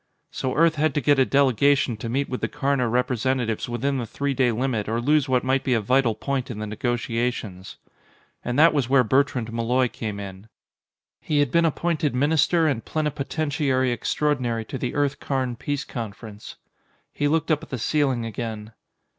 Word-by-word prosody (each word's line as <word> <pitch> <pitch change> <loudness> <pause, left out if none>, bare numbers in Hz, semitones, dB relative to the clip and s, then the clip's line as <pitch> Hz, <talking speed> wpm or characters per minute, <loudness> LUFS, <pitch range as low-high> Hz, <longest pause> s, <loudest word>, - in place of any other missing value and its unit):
So 130 - -3
Earth 165 0 +3
had 150 -1 +1
to - - +3
get 145 +2 +3
a 130 - +4
delegation 140 -1 +3
to 115 +1 -5
meet 135 +4 0
with 125 - -4
the - - 0
Karna 140 -4 0
representatives 125 -1 0
within 135 +3 -1
the 120 - -4
three 140 +5 -2
day 130 -2 +2
limit 115 -3 -1
or 115 +1 0
lose 145 +2 +2
what 125 -1 +2
might 130 +1 +1
be 130 - +1
a - - +2
vital 120 +1 +2
point 135 +1 -3
in 120 - -5
the 105 - -4
negotiations. 115 -3 -3 0.7
And 120 +1 -2
that 160 +2 +6
was 135 -5 0
where 135 -1 +5
Bertrand 125 -1 +1
Malloy 120 +2 +1
came 105 -3 -5
in. 100 +1 -9 0.7
He 150 - -1
had 145 0 +2
been 170 0 +3
appointed 160 -3 0
Minister 160 +4 +3
and 135 -7 0
Plenipotentiary 145 -3 -1
Extraordinary 120 -3 -1
to 130 - -6
the 125 - -3
Earth 145 -1 0
Karn 130 -3 -2
peace 145 +4 -3
conference. 110 -2 -8 0.6
He 145 - 0
looked 160 +2 +1
up 150 - +2
at - - -12
the 130 - -3
ceiling 130 -1 0
again. 110 -1 -5
130 Hz, 180 wpm, -24 LUFS, 115-145 Hz, 0.7 s, that